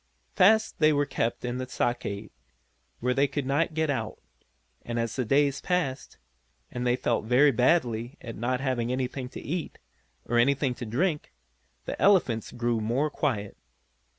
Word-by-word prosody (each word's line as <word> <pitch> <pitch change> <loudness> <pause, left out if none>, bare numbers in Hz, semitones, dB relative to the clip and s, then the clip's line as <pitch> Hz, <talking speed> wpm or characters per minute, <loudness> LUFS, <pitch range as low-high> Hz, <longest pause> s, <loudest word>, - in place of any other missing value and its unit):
Fast 215 +3 +4
they 155 0 +5
were 145 -1 +2
kept 115 -2 -2
in 125 +1 -3
the 130 0 -5
stockade, 110 -5 -2 0.7
where 125 +1 +1
they 140 +2 +3
could 140 0 -3
not 150 +4 0
get 160 -2 +1
out, 115 -5 -3 0.6
and 120 0 -5
as 115 -1 -2
the 130 - 0
days 140 +3 +2
passed, 175 -8 -2 0.5
and 125 0 -3
they 120 - +3
felt 120 -3 -1
very 130 +5 +5
badly 125 -1 +1
at 115 -1 -8
not 125 +3 -1
having 125 -3 -1
anything 130 0 -3
to - - -8
eat, 170 +3 -4 0.5
or 120 0 +1
anything 140 +1 +2
to 120 -1 -7
drink, 150 - -1 0.5
the - - -5
elephants 160 - +3
grew 120 -1 -1
more 130 +8 0
quiet. 105 -11 -2
130 Hz, 160 wpm, -27 LUFS, 120-145 Hz, 0.7 s, they